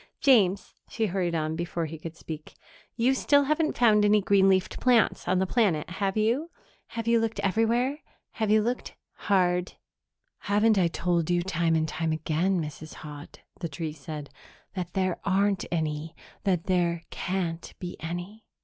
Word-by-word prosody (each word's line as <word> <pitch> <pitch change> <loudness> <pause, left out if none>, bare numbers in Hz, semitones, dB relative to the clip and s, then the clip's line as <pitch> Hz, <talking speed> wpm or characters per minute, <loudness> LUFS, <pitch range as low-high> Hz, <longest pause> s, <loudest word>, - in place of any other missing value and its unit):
James," 200 -8 +3 0.2
she 225 - -1
hurried 180 -3 -1
on, 155 0 -1
before 170 0 -2
he 160 0 -7
could 165 +1 -8
speak, 155 -2 -8 0.4
"you 245 +3 +3
still 285 +2 +3
haven't 305 +2 0
found 215 -3 +5
any 210 0 +5
green 195 -1 +4
leafed 190 -1 +1
plants 245 -3 +3
on 185 - +2
the 190 - +2
planet, 185 -8 +1
have 195 +2 -1
you? 240 +10 +1 0.4
Have 230 -1 -5
you 235 0 +4
looked 225 0 -2
everywhere? 235 +8 +1 0.3
Have 220 -2 -2
you 215 0 +4
looked 245 +3 -3 0.3
hard?" 180 -2 +2 0.7
"Haven't 210 +1 +3
I 175 - +4
told 170 -1 0
you 175 0 +2
time 170 -3 +1
and 160 0 +1
time 160 0 -2
again, 160 +4 0
Mrs. 155 0 -7
Haut," 145 -1 -10 0.2
the 170 - -3
tree 155 +1 -4
said, 150 0 -8 0.4
"that 180 -3 -5
there 185 -2 0
aren't 200 0 +1
any 155 -1 -2 0.3
that 180 -4 +1
there 175 -2 0
can't 175 -3 -3
be 180 -1 -6
any? 175 +7 -6
185 Hz, 165 wpm, -27 LUFS, 165-215 Hz, 0.7 s, found